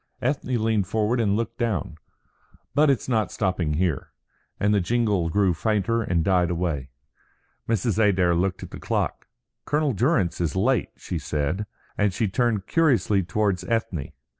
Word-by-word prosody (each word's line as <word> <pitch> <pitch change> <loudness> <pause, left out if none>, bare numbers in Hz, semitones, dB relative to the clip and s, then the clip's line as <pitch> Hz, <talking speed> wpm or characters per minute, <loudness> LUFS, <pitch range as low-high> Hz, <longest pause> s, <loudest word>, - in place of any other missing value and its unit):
Ethne 130 -2 -1
leaned 110 -4 +1
forward 110 +2 0
and 100 -3 +2
looked 115 0 -4
down. 110 -8 -1 0.8
"But 150 +1 +4
it's 135 - +1
not 110 -6 +1
stopping 90 -6 -1
here;" 85 -4 -1 0.5
and 105 +1 +2
the 100 - +3
jingle 105 -4 +1
grew 95 0 +2
fainter 110 +5 0
and 90 -6 0
died 90 -1 +2
away. 80 -6 -2 0.8
Mrs. 110 0 +1
Adair 90 -4 +3
looked 90 +2 0
at - - -9
the - - -8
clock. - - -2 0.4
"Colonel 150 -2 +1
Durrance 105 - +1
is 85 0 -1
late," 120 +6 +1
she - - -4
said, 75 +8 -2 0.3
and 100 -3 +2
she 110 - +1
turned 105 -1 0
curiously 130 -11 +2
towards 95 0 0
Ethne. 110 - -2
105 Hz, 155 wpm, -24 LUFS, 90-115 Hz, 0.8 s, But